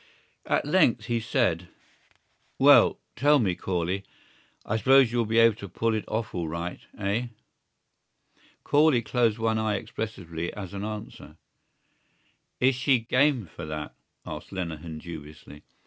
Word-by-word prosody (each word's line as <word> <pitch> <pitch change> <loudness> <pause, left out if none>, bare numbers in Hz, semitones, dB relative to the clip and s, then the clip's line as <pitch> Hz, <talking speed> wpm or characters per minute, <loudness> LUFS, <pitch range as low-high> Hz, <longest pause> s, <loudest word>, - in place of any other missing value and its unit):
At - - +1
length 145 -9 +3
he 120 0 0
said: 110 -7 0 0.9
"Well... - - +6 0.2
tell 145 +4 +4
me, 105 -9 +1
Corley, 90 +2 -2 0.6
I 110 - -1
suppose 135 0 +5
you'll 120 -2 0
be 115 +1 0
able 115 -2 +5
to 100 -3 -8
pull 115 +5 0
it 110 - -2
off 110 +1 -3
all 85 -3 -2
right, 85 +2 -4 0.2
eh?" 105 +5 -1 1.4
Corley 145 -5 +3
closed 115 -1 +1
one 110 -1 0
eye 110 -1 0
expressively 85 -7 -5
as 95 -4 -7
an 100 0 -5
answer. 105 -7 -7 1.2
"Is 130 +2 +4
she 130 +1 +2
game 125 +1 +2
for 85 -1 -9
that?" 75 -1 -5 0.3
asked 75 +1 -8
Lenehan 85 -4 -5
dubiously. 75 -2 -10
110 Hz, 135 wpm, -26 LUFS, 85-120 Hz, 1.4 s, Well